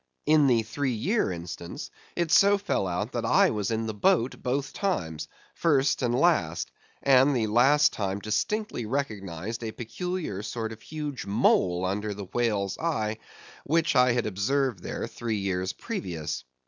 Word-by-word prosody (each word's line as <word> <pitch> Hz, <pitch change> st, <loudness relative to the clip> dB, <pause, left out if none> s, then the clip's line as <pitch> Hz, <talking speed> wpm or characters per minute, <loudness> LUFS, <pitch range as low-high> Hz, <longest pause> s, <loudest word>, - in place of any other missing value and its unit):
In 150 Hz, -1 st, +5 dB
the 120 Hz, -3 st, +3 dB
three 130 Hz, +3 st, -2 dB
year 190 Hz, -, +1 dB
instance, 85 Hz, 0 st, -7 dB, 0.2 s
it 170 Hz, -2 st, -1 dB
so 200 Hz, +5 st, +6 dB
fell 195 Hz, -, -1 dB
out 90 Hz, +7 st, -2 dB
that 120 Hz, -, -2 dB
I 115 Hz, -, +4 dB
was 105 Hz, -3 st, -2 dB
in 115 Hz, 0 st, -1 dB
the 110 Hz, -, -3 dB
boat 115 Hz, +4 st, +1 dB
both 135 Hz, +2 st, -2 dB
times, 85 Hz, -, -2 dB, 0.3 s
first 145 Hz, -5 st, +2 dB
and 120 Hz, -2 st, +1 dB
last, 90 Hz, -, +2 dB, 0.3 s
and 135 Hz, +1 st, +5 dB
the 115 Hz, -3 st, +1 dB
last 135 Hz, +7 st, +4 dB
time 100 Hz, -2 st, -2 dB
distinctly 115 Hz, -, -2 dB
recognised 110 Hz, -, -3 dB
a 110 Hz, -, -3 dB
peculiar 150 Hz, -, -4 dB
sort 110 Hz, +1 st, -4 dB
of 115 Hz, 0 st, -10 dB
huge 150 Hz, -8 st, -5 dB
mole 95 Hz, -4 st, +2 dB
under 105 Hz, +2 st, -2 dB
the 100 Hz, -1 st, -6 dB
whale's 100 Hz, -2 st, -1 dB
eye, 110 Hz, -10 st, -1 dB, 0.4 s
which 165 Hz, +1 st, +1 dB
I 125 Hz, -1 st, +5 dB
had 120 Hz, -1 st, 0 dB
observed 110 Hz, +2 st, 0 dB
there -, -, -4 dB
three 115 Hz, -2 st, -3 dB
years 95 Hz, -1 st, -1 dB
previous. 90 Hz, -, -5 dB
115 Hz, 160 wpm, -27 LUFS, 100-140 Hz, 0.4 s, so